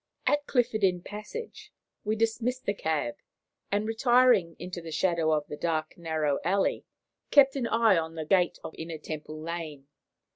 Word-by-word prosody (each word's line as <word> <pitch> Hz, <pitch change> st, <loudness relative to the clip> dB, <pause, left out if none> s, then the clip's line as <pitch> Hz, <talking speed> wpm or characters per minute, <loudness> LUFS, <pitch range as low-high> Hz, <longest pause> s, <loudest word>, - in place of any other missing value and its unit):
At 290 Hz, 0 st, +2 dB
Clifford's 230 Hz, -4 st, +1 dB
Inn 180 Hz, -2 st, +2 dB
Passage 215 Hz, -, -8 dB, 0.3 s
we 215 Hz, +1 st, 0 dB
dismissed 230 Hz, +3 st, -1 dB
the 200 Hz, -, +1 dB
cab, 155 Hz, -10 st, -2 dB, 0.5 s
and, 205 Hz, +2 st, 0 dB
retiring 235 Hz, -6 st, +4 dB
into 180 Hz, 0 st, -6 dB
the 165 Hz, -1 st, -8 dB
shadow 165 Hz, 0 st, +1 dB
of 150 Hz, -1 st, +1 dB
the -, -, -7 dB
dark, 155 Hz, 0 st, -2 dB
narrow 160 Hz, -4 st, -1 dB
alley, 195 Hz, +2 st, +1 dB, 0.4 s
kept 275 Hz, -1 st, +6 dB
an 255 Hz, -4 st, -1 dB
eye 225 Hz, -6 st, +4 dB
on 160 Hz, 0 st, -5 dB
the 160 Hz, -1 st, -4 dB
gate 180 Hz, +1 st, +2 dB
of -, -, -7 dB
Inner 160 Hz, 0 st, -5 dB
Temple 155 Hz, 0 st, -7 dB
Lane. 160 Hz, -4 st, -6 dB
180 Hz, 160 wpm, -28 LUFS, 160-225 Hz, 0.5 s, kept